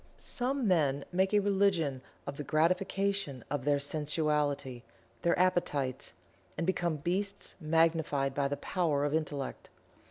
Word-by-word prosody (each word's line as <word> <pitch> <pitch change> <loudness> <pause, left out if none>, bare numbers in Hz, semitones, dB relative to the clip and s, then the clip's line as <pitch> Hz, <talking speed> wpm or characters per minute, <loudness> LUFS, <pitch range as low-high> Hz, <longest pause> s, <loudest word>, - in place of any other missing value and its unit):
Some 260 -1 -1
men 145 -6 +2
make 190 +2 +2
a 210 - +4
religion 190 -9 +2 0.2
of 140 - -5
the 145 - -5
gratification 180 - 0
of 145 -3 -1
their 145 -1 +3
sensuality 145 -3 -1 0.4
their 170 - +2
appetites 160 -8 0 0.5
and 165 - -1
become 175 -3 0
beasts 185 +7 -2
magnified 155 -3 +2
by 140 0 +1
the 145 +1 -2
power 155 -6 0
of 145 - -1
Intellect. 145 -4 -3
155 Hz, 130 wpm, -31 LUFS, 145-185 Hz, 0.5 s, a